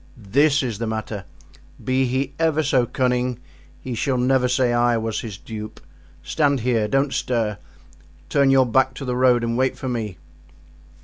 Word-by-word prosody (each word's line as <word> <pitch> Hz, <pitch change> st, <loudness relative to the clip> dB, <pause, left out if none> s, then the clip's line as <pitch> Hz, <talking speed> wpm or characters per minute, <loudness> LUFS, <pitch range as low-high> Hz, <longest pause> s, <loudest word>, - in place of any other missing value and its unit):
"This 140 Hz, +7 st, +2 dB
is 115 Hz, -5 st, -3 dB
the 115 Hz, -, -2 dB
matter: 110 Hz, -3 st, -4 dB, 0.6 s
be 130 Hz, +1 st, +1 dB
he 130 Hz, +2 st, -1 dB
ever 160 Hz, -1 st, +2 dB
so 130 Hz, -4 st, +2 dB
cunning 125 Hz, -1 st, 0 dB, 0.4 s
he 130 Hz, -, -6 dB
shall 130 Hz, +3 st, 0 dB
never 125 Hz, +1 st, +2 dB
say 125 Hz, -1 st, +1 dB
I 120 Hz, 0 st, +3 dB
was 110 Hz, -1 st, -2 dB
his 105 Hz, -5 st, -7 dB
dupe. 110 Hz, 0 st, -8 dB, 0.4 s
Stand 140 Hz, -, +1 dB
here, 115 Hz, -3 st, +1 dB
don't 135 Hz, +4 st, +1 dB
stir, 115 Hz, -4 st, -1 dB, 0.7 s
turn 140 Hz, -2 st, +3 dB
your 135 Hz, -1 st, +5 dB
back 130 Hz, +2 st, +2 dB
to 135 Hz, -, -6 dB
the 125 Hz, -1 st, -2 dB
road 125 Hz, -1 st, +3 dB
and 115 Hz, 0 st, -1 dB
wait 130 Hz, 0 st, +1 dB
for 130 Hz, -, -4 dB
me." 110 Hz, -6 st, -3 dB
125 Hz, 170 wpm, -22 LUFS, 115-135 Hz, 0.7 s, your